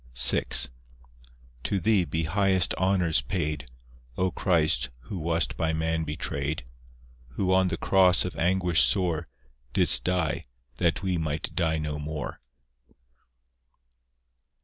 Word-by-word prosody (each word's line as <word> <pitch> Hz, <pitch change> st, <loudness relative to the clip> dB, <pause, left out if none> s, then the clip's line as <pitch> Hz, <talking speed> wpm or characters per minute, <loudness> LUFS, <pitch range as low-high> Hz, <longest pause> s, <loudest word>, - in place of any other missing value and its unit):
VI 60 Hz, +1 st, +4 dB, 1.2 s
To 100 Hz, +9 st, -1 dB
Thee 100 Hz, -1 st, +2 dB
be 80 Hz, +1 st, -2 dB
highest 95 Hz, +2 st, +2 dB
honours 90 Hz, -7 st, +1 dB
paid, 75 Hz, -2 st, -3 dB, 0.5 s
O 95 Hz, 0 st, +1 dB
Christ, 80 Hz, -10 st, +1 dB
who 100 Hz, -, -7 dB
wast 85 Hz, +1 st, 0 dB
by 80 Hz, -1 st, 0 dB
man 80 Hz, 0 st, -1 dB
betrayed; 75 Hz, 0 st, -3 dB, 0.7 s
Who 95 Hz, +8 st, 0 dB
on 95 Hz, 0 st, +4 dB
the 85 Hz, -2 st, -2 dB
cross 90 Hz, -2 st, +4 dB
of 90 Hz, -, -5 dB
anguish 90 Hz, -2 st, +2 dB
sore 80 Hz, +6 st, +2 dB, 0.5 s
Didst -, -, +5 dB
die, 90 Hz, -3 st, 0 dB, 0.4 s
that 85 Hz, +1 st, 0 dB
we 90 Hz, -3 st, 0 dB
might 80 Hz, 0 st, -3 dB
die 80 Hz, -3 st, 0 dB
no 75 Hz, -1 st, -4 dB
more. 75 Hz, 0 st, -5 dB
80 Hz, 120 wpm, -26 LUFS, 75-90 Hz, 1.2 s, Didst